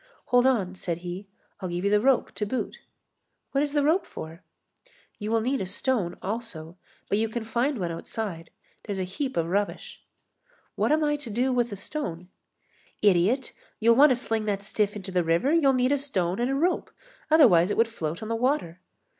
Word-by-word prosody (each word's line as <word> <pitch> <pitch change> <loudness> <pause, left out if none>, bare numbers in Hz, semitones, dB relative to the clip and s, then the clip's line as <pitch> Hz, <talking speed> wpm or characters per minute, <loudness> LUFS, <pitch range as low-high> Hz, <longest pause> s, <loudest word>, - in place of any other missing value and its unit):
"Hold 245 +1 +6
on," 200 -8 +1
said 175 -3 -3
he, 180 +3 -6 0.3
"I'll 185 - -4
give 175 +2 -3
you 200 - +2
the 210 0 +4
rope 265 +1 +2
to 210 - -3
boot." 255 +5 -3 0.7
"What 275 - +1
is 290 -1 -3
the 290 -1 +2
rope 320 +6 +2
for?" 160 +2 -9 0.8
"You 210 0 -4
will 225 0 +2
need 260 +4 0
a 190 - -3
stone 205 -2 -1
also, 190 -6 -4 0.3
but 205 - +1
you 225 0 0
can 230 +1 -4
find 245 +5 0
one 175 -4 -2
outside. 170 0 -5 0.3
There's 205 -3 -4
a 190 - -1
heap 260 +8 -4
of 165 - +2
rubbish." 200 +4 -3 0.7
"What - - 0
am 310 +1 +3
I 295 0 +1
to 275 -5 -7
do 250 +5 +1
with 240 -2 +1
a - - -4
stone?" 185 - -5 0.7
"Idiot, 205 +7 +3 0.3
you'll 230 +1 +5
want 290 +4 +7
to 255 - +4
sling 225 -3 -2
that 200 -1 -1
stiff 205 0 -1
into 195 -2 -6
the 180 -1 +2
river, 170 - +2
you'll 305 -5 +5
need 255 +1 +2
a 285 - +2
stone 190 -10 -1
and 240 +2 +1
a 270 - 0
rope, 345 +6 0 0.4
otherwise 190 - +6
it - - -1
would 230 - +4
float 170 -6 -5
on - - -5
the 230 - -1
water." 225 - -1
220 Hz, 205 wpm, -26 LUFS, 185-260 Hz, 0.8 s, want